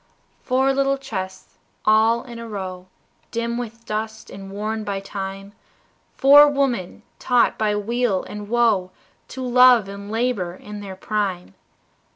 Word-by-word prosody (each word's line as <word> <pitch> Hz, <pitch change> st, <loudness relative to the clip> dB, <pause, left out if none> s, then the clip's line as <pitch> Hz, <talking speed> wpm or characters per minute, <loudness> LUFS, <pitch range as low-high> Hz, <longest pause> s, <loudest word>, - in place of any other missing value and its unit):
Four 265 Hz, +1 st, +2 dB
little 275 Hz, 0 st, +1 dB
chests 190 Hz, -8 st, -7 dB, 0.3 s
all 220 Hz, +2 st, +4 dB
in 235 Hz, -3 st, -9 dB
a 230 Hz, 0 st, -8 dB
row, 185 Hz, -3 st, -6 dB, 0.4 s
Dim 235 Hz, +1 st, -2 dB
with 230 Hz, -1 st, -8 dB
dust, 220 Hz, +1 st, -5 dB
and 195 Hz, 0 st, -9 dB
worn 215 Hz, +2 st, -3 dB
by 200 Hz, -2 st, -3 dB
time, 195 Hz, 0 st, -7 dB, 0.6 s
Four 290 Hz, +2 st, +8 dB
women, 255 Hz, -9 st, -1 dB, 0.2 s
taught 245 Hz, -1 st, +3 dB
by 210 Hz, -1 st, 0 dB
weal 220 Hz, -1 st, 0 dB
and 210 Hz, 0 st, -8 dB
woe 225 Hz, -6 st, +2 dB, 0.4 s
To 260 Hz, -, -7 dB
love 250 Hz, -3 st, +6 dB
and 200 Hz, +1 st, -8 dB
labor 220 Hz, -6 st, -1 dB
in 210 Hz, +2 st, -9 dB
their 195 Hz, -2 st, -8 dB
prime. 190 Hz, -, -3 dB
215 Hz, 140 wpm, -22 LUFS, 195-240 Hz, 0.6 s, Four